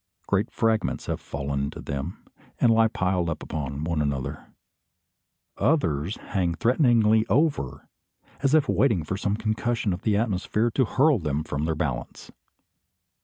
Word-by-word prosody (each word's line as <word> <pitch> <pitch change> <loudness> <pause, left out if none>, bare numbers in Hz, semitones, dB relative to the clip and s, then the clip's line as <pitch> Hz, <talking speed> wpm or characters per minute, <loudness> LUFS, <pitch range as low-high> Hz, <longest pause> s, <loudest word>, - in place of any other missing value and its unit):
Great 100 +3 +1
fragments 110 -1 0
have - - -3
fallen 70 0 -3
into - - -7
them, 70 +5 -5 0.3
and 115 -2 +5
lie 115 0 +5
piled 90 -4 0
one 85 - -2 0.4
upon 80 +2 -1
another. 70 -3 -3 1.1
Others 90 - +1 0.2
hang 90 -4 +1
threatening 120 - +3 0.2
over, 135 - 0 0.5
as 140 +2 +3
if 150 -2 +3
waiting 110 - +2
for 95 - -3
some 100 +1 -1
concussion 110 -1 -1
of 90 - -5
the 105 -2 +1
atmosphere 110 +2 0
to 130 +2 +2
hurl 135 +3 +3
them 75 -2 -2
from 75 -1 -3
their 80 0 0
balance. - - -4
100 Hz, 140 wpm, -25 LUFS, 80-115 Hz, 1.1 s, and